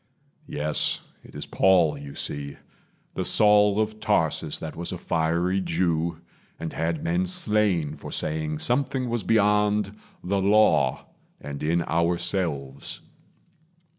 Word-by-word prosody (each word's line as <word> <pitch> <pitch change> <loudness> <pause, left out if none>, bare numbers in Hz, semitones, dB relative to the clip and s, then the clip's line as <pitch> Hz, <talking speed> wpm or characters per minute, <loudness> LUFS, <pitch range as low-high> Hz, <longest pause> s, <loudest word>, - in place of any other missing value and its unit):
Yes, 75 +1 0 0.2
it - - -16
is - - -6
Paul 90 -6 +3
you 70 0 -9
see 70 -1 -4 0.6
the - - -2
Saul 105 -1 +4
of 110 0 -1
Tarsus 80 -7 0
That 80 - -7
was 85 +1 -4
a 90 - -4
fiery 85 +3 0
Jew, 85 -1 -1 0.4
and 80 -1 -5
had 80 -1 -2
men 90 +2 0
slain 90 -6 +1
For - - -9
saying 75 0 -1
Something 130 - 0
was 120 -2 -1
beyond 105 -1 +2 0.3
the 95 +2 0
Law, 105 +3 +3 0.3
And 70 -1 -7
in 85 +2 +1
ourselves. 85 -5 -2
85 Hz, 125 wpm, -25 LUFS, 80-105 Hz, 0.6 s, Saul